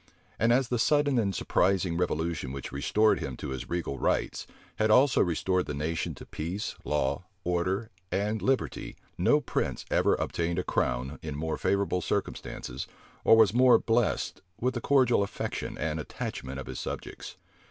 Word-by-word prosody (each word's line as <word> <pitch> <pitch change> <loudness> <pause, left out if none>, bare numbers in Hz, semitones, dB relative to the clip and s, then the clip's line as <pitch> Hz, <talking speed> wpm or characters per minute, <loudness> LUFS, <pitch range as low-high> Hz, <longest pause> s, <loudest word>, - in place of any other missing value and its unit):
And 115 +2 +4
as 125 0 +3
the 120 - 0
sudden 145 0 +3
and 100 -4 0
surprising 95 -2 +1
revolution 80 -4 -1
which 70 0 -6
restored 105 +10 +2
him 65 -2 -5
to - - -5
his 65 -1 -5
regal 85 -6 -2
rights, - - 0 0.3
had 110 0 +2
also 125 +4 +5
restored 90 +1 +1
the 75 - -3
nation 80 +3 -2
to - - -11
peace, 90 +7 -4
law, 75 +3 -1 0.2
order, 95 +6 -1 0.2
and 105 +2 0
liberty, 135 0 -1 0.2
no - - +4
prince - - -2
ever - - +3
obtained 85 0 -1
a - - 0
crown 65 +5 -1
in 75 -2 -5
more 80 +2 -2
favorable 100 -2 +1
circumstances, 65 -5 -3 0.4
or 115 - +7
was 110 -3 +6
more 125 +1 +7
blessed 115 0 0 0.2
with 125 +1 +1
the 120 - -3
cordial 130 -5 +4
affection 100 - -3
and 80 +1 -2
attachment 65 -3 -5
of 70 - -6
his - - -6
subjects. - - -6
90 Hz, 165 wpm, -29 LUFS, 75-115 Hz, 0.4 s, or